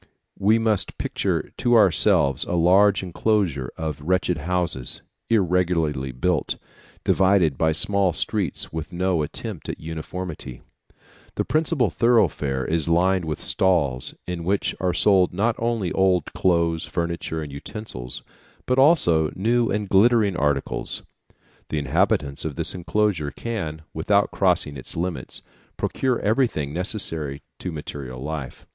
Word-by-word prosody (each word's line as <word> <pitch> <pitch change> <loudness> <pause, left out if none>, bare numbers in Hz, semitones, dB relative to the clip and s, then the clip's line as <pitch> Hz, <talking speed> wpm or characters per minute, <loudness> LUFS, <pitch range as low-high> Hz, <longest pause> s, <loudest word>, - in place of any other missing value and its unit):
We 105 +3 +4
must 110 -3 0
picture - - -2
to 120 0 +3
ourselves 85 - +4
a - - -3
large 95 +4 +4
enclosure 90 - 0
of 80 -3 -4
wretched 90 0 0
houses, 85 -6 -2 0.3
irregularly 85 - +1
built, 80 +5 -1 0.5
divided 95 -6 +3
by 80 +3 +2
small 100 +3 +2
streets 100 -2 -2
with 80 +2 -5
no 90 -1 0
attempt 75 - -6
at - - -4
uniformity. 80 -4 -6 0.7
The - - -1
principal 155 - +1
thoroughfare 85 - +2
is 80 0 0
lined 90 +1 +2
with 75 -2 -3
stalls, 75 -10 +1
in 90 -2 -4
which 95 +3 0
are 90 -1 +1
sold 95 -1 +3
not 110 +4 +1
only 115 -6 -1
old 95 -4 +1
clothes, 85 -3 +1
furniture, 85 -2 -3
and 75 - -8
utensils, 70 - -7 0.4
but 125 +1 +1
also 85 - +4
new 115 +4 +1
and 105 0 -1
glittering 105 0 +4
articles. 75 -4 -1 0.7
The 80 - -2
inhabitants 75 -1 +1
of 80 -3 -4
this - - -1
enclosure 90 -3 0
can, 80 -3 -5
without 100 +6 +2
crossing 90 -6 +1
its 65 - -6
limits, 90 0 -4 0.3
procure 130 -2 0
everything 105 - 0
necessary 80 -6 -3 0.2
to 90 - -4
material 70 -4 -7
life. 70 -1 -6
90 Hz, 130 wpm, -23 LUFS, 75-100 Hz, 0.7 s, We